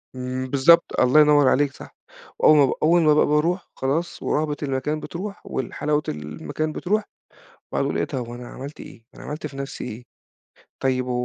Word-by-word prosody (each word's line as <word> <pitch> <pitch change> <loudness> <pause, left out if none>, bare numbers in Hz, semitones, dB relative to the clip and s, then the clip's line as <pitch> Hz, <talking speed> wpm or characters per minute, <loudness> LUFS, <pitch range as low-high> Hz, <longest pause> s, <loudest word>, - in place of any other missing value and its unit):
إمم 130 0 -4
بالضبط، 145 +6 +4
الله 130 +4 +5
ينوّر 145 -2 +5
عليك 145 0 +2
صح، - - -13 0.4
وأول 155 - +6
ما 140 - +7
بق 130 - -1
أول 170 +2 +5
ما 155 -2 +5
با 150 - +4
باروح 165 +5 0
خلاص 150 +6 -2
ورهبة 150 -1 0
المكان 140 +2 -2
بتروح 195 +6 -7
وال 130 - -4
حلاوة 150 0 0
المكان 75 - -4
بتروح، 210 +7 -1 0.7
واقعُد - - 0
أقول - - -1
إيه - - 0
ده 140 - -5
هو 120 -1 -5
أنا 125 0 -9
عملت 140 +5 -9
إيه، 115 - -12
أنا - - -11
عملت 150 +1 -5
في 135 -2 -12
نَفسي 140 0 -6
إيه؟ 120 +1 -7 0.8
طيب 130 -1 0
و - - -2
145 Hz, 190 wpm, -23 LUFS, 130-155 Hz, 0.8 s, ما